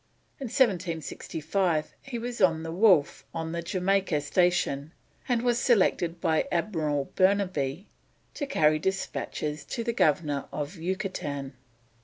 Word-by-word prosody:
In 275 Hz, -, -4 dB
1765 170 Hz, -, 0 dB
he 265 Hz, -3 st, -6 dB
was 240 Hz, 0 st, -4 dB
on 165 Hz, -4 st, +4 dB
the 165 Hz, -, -4 dB
Wolf 180 Hz, -5 st, +4 dB
on 160 Hz, 0 st, -3 dB
the 170 Hz, 0 st, -2 dB
Jamaica 185 Hz, -1 st, +1 dB
station, 155 Hz, -2 st, +1 dB, 0.4 s
and 240 Hz, -1 st, +2 dB
was 240 Hz, -1 st, +2 dB
selected 180 Hz, -8 st, +2 dB
by 165 Hz, -3 st, +1 dB
Admiral 155 Hz, -6 st, -1 dB
Burnaby 185 Hz, -4 st, +1 dB, 0.5 s
to 285 Hz, -, -4 dB
carry 155 Hz, -, +3 dB
despatches 155 Hz, -4 st, -3 dB
to 235 Hz, -, -4 dB
the 235 Hz, 0 st, -1 dB
Governor 150 Hz, -, +1 dB
of 150 Hz, +5 st, -4 dB
Yucatan. 165 Hz, -6 st, -3 dB
175 Hz, 125 wpm, -28 LUFS, 155-200 Hz, 0.5 s, on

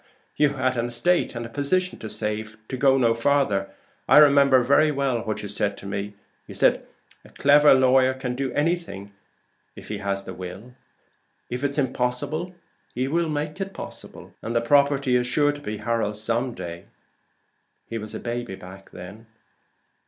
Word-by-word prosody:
"You 145 Hz, -2 st, +2 dB
had 130 Hz, -1 st, 0 dB
an 120 Hz, +1 st, 0 dB
estate 150 Hz, +7 st, +1 dB
and 120 Hz, 0 st, -4 dB
a -, -, -8 dB
position 180 Hz, +9 st, -1 dB
to 110 Hz, -, -7 dB
save, 105 Hz, 0 st, -4 dB
to 130 Hz, -, -3 dB
go 135 Hz, +1 st, +4 dB
no 115 Hz, -3 st, +3 dB
farther. 115 Hz, -5 st, +1 dB, 0.4 s
I -, -, +7 dB
remember 140 Hz, -3 st, +6 dB
very 140 Hz, +4 st, +4 dB
well 140 Hz, -4 st, 0 dB
what 110 Hz, -2 st, -4 dB
you -, -, -4 dB
said 100 Hz, 0 st, -2 dB
to -, -, -12 dB
me 100 Hz, +1 st, -4 dB, 0.4 s
'A -, -, +2 dB, 0.6 s
clever 145 Hz, 0 st, +6 dB
lawyer 130 Hz, 0 st, +4 dB
can 130 Hz, -2 st, -4 dB
do 130 Hz, 0 st, -3 dB
anything 145 Hz, -, -2 dB, 0.6 s
if -, -, -12 dB
he -, -, -4 dB
has 100 Hz, 0 st, -2 dB
the -, -, -8 dB
will; 95 Hz, +7 st, -9 dB, 0.8 s
if 125 Hz, +2 st, -4 dB
it's 140 Hz, 0 st, -1 dB
impossible, 135 Hz, +6 st, -2 dB, 0.4 s
he 130 Hz, +2 st, -1 dB
will 165 Hz, +3 st, 0 dB
make 150 Hz, +4 st, -3 dB
it 195 Hz, 0 st, -5 dB
possible. -, -, -10 dB
And 115 Hz, +1 st, -4 dB
the 115 Hz, -, +3 dB
property 140 Hz, 0 st, +3 dB
is 125 Hz, 0 st, +1 dB
sure 145 Hz, +3 st, +2 dB
to 145 Hz, 0 st, -9 dB
be 110 Hz, -6 st, -5 dB
Harold's 110 Hz, -3 st, -1 dB
some 115 Hz, +3 st, -1 dB
day.' 85 Hz, -4 st, -7 dB, 1.0 s
He 115 Hz, -, -5 dB
was 110 Hz, 0 st, -8 dB
a -, -, -4 dB
baby 120 Hz, -4 st, -4 dB, 0.4 s
then." 100 Hz, +6 st, -11 dB
125 Hz, 165 wpm, -24 LUFS, 110-145 Hz, 1.0 s, I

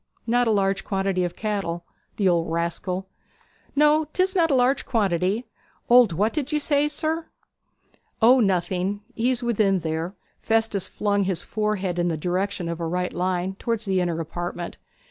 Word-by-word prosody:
'H'm, -, -, -39 dB
not 245 Hz, 0 st, +3 dB
a -, -, +3 dB
large 195 Hz, -2 st, +1 dB
quantity 195 Hz, -2 st, 0 dB
of 175 Hz, -1 st, -3 dB
cattle. 195 Hz, -6 st, -3 dB, 0.3 s
The 200 Hz, -, +2 dB
old 170 Hz, -2 st, +2 dB
rascal!' 180 Hz, +3 st, -2 dB, 0.7 s
'No, 300 Hz, +2 st, +4 dB
'tis 375 Hz, +3 st, +1 dB
not 335 Hz, -3 st, +3 dB
a 275 Hz, -, +3 dB
large 260 Hz, +2 st, +3 dB
quantity. 200 Hz, 0 st, 0 dB, 0.5 s
Old 245 Hz, -4 st, +7 dB
what 205 Hz, +7 st, +1 dB
did 295 Hz, -2 st, -2 dB
you 305 Hz, -, +1 dB
say, 290 Hz, 0 st, +2 dB
sir?' 315 Hz, +2 st, -2 dB, 0.9 s
'O 245 Hz, +3 st, +6 dB
nothing. 190 Hz, 0 st, 0 dB
He's 245 Hz, +1 st, 0 dB
within 205 Hz, -5 st, +2 dB
there.' 160 Hz, +4 st, -3 dB, 0.3 s
Festus 225 Hz, -3 st, +1 dB
flung 205 Hz, -1 st, 0 dB
his 185 Hz, -3 st, -1 dB
forehead 205 Hz, -5 st, -1 dB
in 175 Hz, -, +1 dB
the 165 Hz, -2 st, -1 dB
direction 180 Hz, +2 st, -2 dB
of 170 Hz, 0 st, -4 dB
a 165 Hz, -, -2 dB
right 180 Hz, +2 st, -2 dB
line 180 Hz, +1 st, -1 dB
towards 230 Hz, -2 st, -2 dB
the 190 Hz, -2 st, +1 dB
inner 170 Hz, -2 st, -1 dB
apartment. 175 Hz, +1 st, -5 dB
195 Hz, 165 wpm, -24 LUFS, 175-240 Hz, 0.9 s, Old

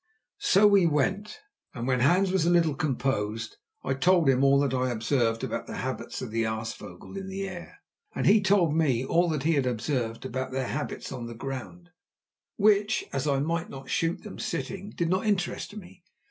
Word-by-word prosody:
So 210 Hz, -, +4 dB
we 200 Hz, -4 st, +6 dB
went, 190 Hz, +8 st, -1 dB, 0.3 s
and 120 Hz, -2 st, -4 dB
when 130 Hz, -1 st, +2 dB
Hans 180 Hz, +9 st, +3 dB
was 190 Hz, -3 st, +2 dB
a -, -, +4 dB
little 170 Hz, -3 st, +3 dB
composed 125 Hz, -6 st, -2 dB, 0.3 s
I 135 Hz, -, 0 dB
told 175 Hz, +3 st, +3 dB
him 135 Hz, 0 st, +4 dB
all 140 Hz, 0 st, +5 dB
that 140 Hz, -2 st, 0 dB
I 130 Hz, 0 st, +1 dB
had 120 Hz, -2 st, -2 dB
observed 115 Hz, -1 st, 0 dB
about -, -, -3 dB
the -, -, -6 dB
habits -, -, -4 dB
of -, -, -6 dB
the 115 Hz, +1 st, 0 dB
aasvogel 110 Hz, -, -5 dB
in 195 Hz, 0 st, -5 dB
the 195 Hz, +1 st, -4 dB
air, 185 Hz, -, -9 dB, 0.4 s
and -, -, -1 dB
he 210 Hz, +1 st, +6 dB
told 190 Hz, -5 st, +3 dB
me 135 Hz, -6 st, +2 dB
all 170 Hz, +5 st, +2 dB
that 150 Hz, -4 st, -1 dB
he 165 Hz, +2 st, +3 dB
had 140 Hz, -4 st, +1 dB
observed 120 Hz, -1 st, -2 dB
about 130 Hz, +1 st, -3 dB
their 130 Hz, -1 st, -2 dB
habits -, -, -4 dB
on 120 Hz, -1 st, -5 dB
the 120 Hz, -, -8 dB
ground, 135 Hz, +8 st, -7 dB, 0.6 s
which, 210 Hz, 0 st, +3 dB
as 135 Hz, +1 st, -1 dB
I 140 Hz, -1 st, +2 dB
might 165 Hz, +3 st, -1 dB
not 135 Hz, -1 st, -9 dB
shoot 165 Hz, +1 st, 0 dB
them 210 Hz, -, -9 dB
sitting, 195 Hz, +4 st, -4 dB
did 170 Hz, -5 st, -2 dB
not 185 Hz, +5 st, 0 dB
interest 205 Hz, 0 st, -1 dB
me. 180 Hz, -3 st, -12 dB
150 Hz, 200 wpm, -27 LUFS, 130-185 Hz, 0.6 s, we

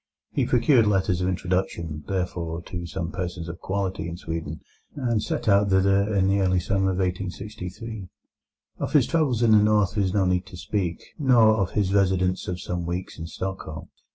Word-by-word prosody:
He -, -, 0 dB
procured 125 Hz, -2 st, +4 dB
letters 95 Hz, -3 st, +1 dB
of 90 Hz, -, +1 dB
introduction, 90 Hz, -4 st, -2 dB
therefore, 85 Hz, -3 st, -3 dB
to 85 Hz, -1 st, -6 dB
some 85 Hz, +1 st, -4 dB
persons 90 Hz, -2 st, -4 dB
of 85 Hz, +1 st, -7 dB
quality 95 Hz, -3 st, -2 dB
in 85 Hz, -, -6 dB
Sweden, 80 Hz, -3 st, -5 dB, 0.3 s
and 120 Hz, -6 st, 0 dB
set -, -, -3 dB
out 100 Hz, 0 st, +4 dB
thither 100 Hz, +2 st, +3 dB
in 95 Hz, -1 st, +3 dB
the 100 Hz, +1 st, +2 dB
early 95 Hz, -1 st, +2 dB
summer 95 Hz, +2 st, +1 dB
of 95 Hz, -, -1 dB
1863. 95 Hz, +3 st, -4 dB, 0.7 s
Of -, -, -3 dB
his 145 Hz, -5 st, +5 dB
travels 135 Hz, -8 st, +1 dB
in 115 Hz, -, +5 dB
the 110 Hz, -, +8 dB
North 105 Hz, -2 st, +3 dB
there 105 Hz, -2 st, +1 dB
is 95 Hz, -, 0 dB
no 95 Hz, -1 st, +2 dB
need 90 Hz, 0 st, 0 dB
to 90 Hz, -, -10 dB
speak, 90 Hz, -1 st, -2 dB, 0.2 s
nor 120 Hz, -6 st, +5 dB
of 100 Hz, -4 st, -1 dB
his 100 Hz, -2 st, +1 dB
residence 95 Hz, -2 st, +2 dB
of 90 Hz, -1 st, -3 dB
some 90 Hz, -1 st, -4 dB
weeks 90 Hz, 0 st, -4 dB
in 80 Hz, -, -5 dB
Stockholm. 90 Hz, -2 st, -6 dB
95 Hz, 185 wpm, -25 LUFS, 90-105 Hz, 0.7 s, the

